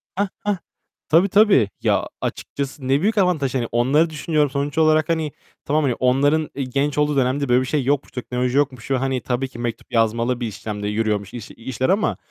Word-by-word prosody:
Hah, 200 Hz, +2 st, +1 dB, 0.2 s
hah. 205 Hz, -1 st, 0 dB, 0.5 s
Tabii, 170 Hz, +5 st, +4 dB
tabii. 200 Hz, -, +5 dB
Ya, -, -, +1 dB
açıkçası 140 Hz, -1 st, -4 dB
ne 135 Hz, +2 st, +2 dB
büyük 215 Hz, +3 st, +1 dB
avantaj 160 Hz, -9 st, +1 dB
hani. 120 Hz, -3 st, 0 dB
Onları 135 Hz, +8 st, +3 dB
düşünüyorum 150 Hz, -1 st, 0 dB
sonuç 140 Hz, +2 st, -3 dB
olarak. 155 Hz, 0 st, +3 dB
Hani, 160 Hz, -2 st, 0 dB, 0.3 s
tamam 150 Hz, +2 st, +1 dB
hani, 135 Hz, -4 st, +2 dB
onların, 145 Hz, +5 st, +2 dB
eee, 140 Hz, -, -2 dB
genç 140 Hz, +3 st, -1 dB
olduğu 150 Hz, 0 st, +2 dB
dönemde 135 Hz, +1 st, +1 dB
böyle 125 Hz, +1 st, +4 dB
bir -, -, -2 dB
şey 145 Hz, +1 st, 0 dB
yok. 140 Hz, +2 st, -1 dB
Teknoloji 125 Hz, +1 st, -2 dB
yokmuş 135 Hz, -3 st, -1 dB
ve, 135 Hz, -, +3 dB
hani, 130 Hz, -1 st, -1 dB
tabii 130 Hz, +1 st, -2 dB
ki 125 Hz, -2 st, -12 dB
mektup 120 Hz, 0 st, -5 dB
yazmalı 115 Hz, +2 st, +1 dB
bir 120 Hz, -, -2 dB
işlemde 105 Hz, 0 st, -5 dB
yürüyormuş 105 Hz, -2 st, -1 dB
iş 120 Hz, -4 st, -8 dB
işler 130 Hz, +2 st, -3 dB
ama, 205 Hz, +3 st, +1 dB
135 Hz, 195 wpm, -21 LUFS, 125-150 Hz, 0.5 s, tabii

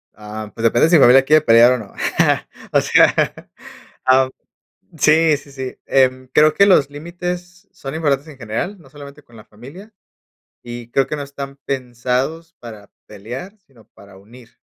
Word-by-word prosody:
Ah, 105 Hz, 0 st, -9 dB
pues 115 Hz, -, -8 dB
depende 120 Hz, +7 st, +3 dB
si 175 Hz, -, +4 dB
mi 145 Hz, -, +6 dB
familia 130 Hz, +2 st, +6 dB
quiere 155 Hz, +2 st, +4 dB
pelear 115 Hz, +2 st, +6 dB
o -, -, -1 dB
no. 105 Hz, -4 st, -11 dB, 0.8 s
O -, -, +4 dB
sea, -, -, +4 dB, 0.9 s
ah, 130 Hz, 0 st, +4 dB, 0.7 s
sí, 155 Hz, 0 st, +4 dB
sí, 140 Hz, 0 st, -15 dB
sí. 130 Hz, -2 st, -7 dB
Em, 130 Hz, -1 st, +1 dB
creo 155 Hz, 0 st, +4 dB
que 200 Hz, -, +4 dB
los 145 Hz, -8 st, +3 dB
límites 175 Hz, +4 st, -7 dB
son 135 Hz, +1 st, -8 dB
importantes 145 Hz, -2 st, -1 dB
en 140 Hz, -, -13 dB
general, 130 Hz, -, -5 dB
no 135 Hz, -5 st, -19 dB
solamente 145 Hz, 0 st, -13 dB
con 120 Hz, -, -20 dB
la 110 Hz, -, -14 dB
familia, 145 Hz, -, -14 dB, 0.7 s
y 120 Hz, -1 st, -9 dB
creo 135 Hz, +1 st, +1 dB
que 150 Hz, -, -4 dB
no 145 Hz, -, -5 dB
están 140 Hz, 0 st, -8 dB
pensados 130 Hz, +6 st, -3 dB
para 110 Hz, -4 st, -12 dB, 0.2 s
pelear, 125 Hz, -, -9 dB
sino 120 Hz, -6 st, -23 dB
para 100 Hz, -1 st, -18 dB
unir. 120 Hz, +4 st, -18 dB
135 Hz, 165 wpm, -18 LUFS, 120-155 Hz, 0.9 s, mi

